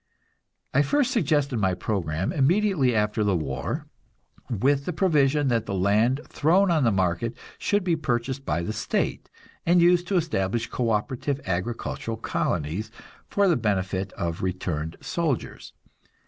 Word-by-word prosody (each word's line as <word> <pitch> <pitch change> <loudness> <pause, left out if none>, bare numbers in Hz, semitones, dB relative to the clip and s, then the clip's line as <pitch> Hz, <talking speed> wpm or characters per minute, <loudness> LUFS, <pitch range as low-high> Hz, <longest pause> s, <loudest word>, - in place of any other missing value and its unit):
I 140 - +5
first 255 - +2
suggested 145 - +1
my 95 -3 +1
program 90 -3 -2
immediately 155 - +2
after 105 0 +1
the 100 -2 +2
war, 70 -6 -3 0.6
with 135 +5 +1
the 180 - -2
provision 150 -5 +2
that 115 -2 0
the 100 - -2
land 105 +8 +2
thrown 180 +5 +3
on 155 -4 +3
the 115 - +4
market 95 +4 0 0.2
should 205 -1 +1
be 175 -2 +2
purchased 130 -2 -2
by 85 - -1
the 110 - -3
state, - - -2 0.3
and 175 +1 +4
used 175 0 +4
to 195 - +1
establish 115 - 0
co 120 -2 0
operative 130 +5 -1
agricultural 110 +4 -3
colonies 85 +7 -2 0.4
for 200 -1 +2
the 175 - +4
benefit 95 -4 -1
of 85 -1 -3
returned 85 -4 -3
soldiers. 160 -7 -3
120 Hz, 145 wpm, -25 LUFS, 95-155 Hz, 0.6 s, I